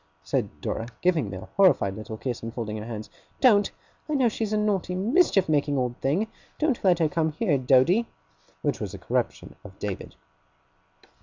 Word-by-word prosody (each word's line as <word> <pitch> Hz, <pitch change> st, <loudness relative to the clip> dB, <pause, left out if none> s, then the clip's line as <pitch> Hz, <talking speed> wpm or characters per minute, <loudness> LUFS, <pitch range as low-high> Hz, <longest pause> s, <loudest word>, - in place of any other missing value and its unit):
said -, -, -1 dB
Dora, 115 Hz, -, -3 dB, 0.2 s
giving 165 Hz, -, +2 dB
me 95 Hz, -, -6 dB
a -, -, -8 dB, 0.2 s
horrified 180 Hz, -, +4 dB
little 110 Hz, 0 st, -7 dB
kiss, 125 Hz, 0 st, -4 dB
and 115 Hz, -, -5 dB
folding 110 Hz, -2 st, -4 dB
her 105 Hz, -, -6 dB
hands. 110 Hz, -2 st, -6 dB, 0.3 s
'Don't. 205 Hz, -6 st, +5 dB, 0.4 s
I 305 Hz, -, 0 dB
know 255 Hz, -4 st, +4 dB
she's 220 Hz, -1 st, -3 dB
a 215 Hz, -, +2 dB
naughty, 200 Hz, -4 st, 0 dB
mischief 215 Hz, -, +3 dB
making 145 Hz, -2 st, +1 dB
old 125 Hz, -2 st, -1 dB
thing! 155 Hz, +11 st, +1 dB, 0.3 s
Don't 300 Hz, -6 st, 0 dB
let 180 Hz, -3 st, +5 dB
her 165 Hz, -2 st, +3 dB
come 160 Hz, -1 st, 0 dB
here, 150 Hz, -, +1 dB
Doady!' 135 Hz, -, +4 dB, 0.6 s
which -, -, 0 dB
was -, -, -5 dB
a -, -, -7 dB
corruption -, -, -2 dB
of 95 Hz, -2 st, -12 dB
David. 100 Hz, -3 st, -5 dB
155 Hz, 180 wpm, -26 LUFS, -, 0.6 s, Don't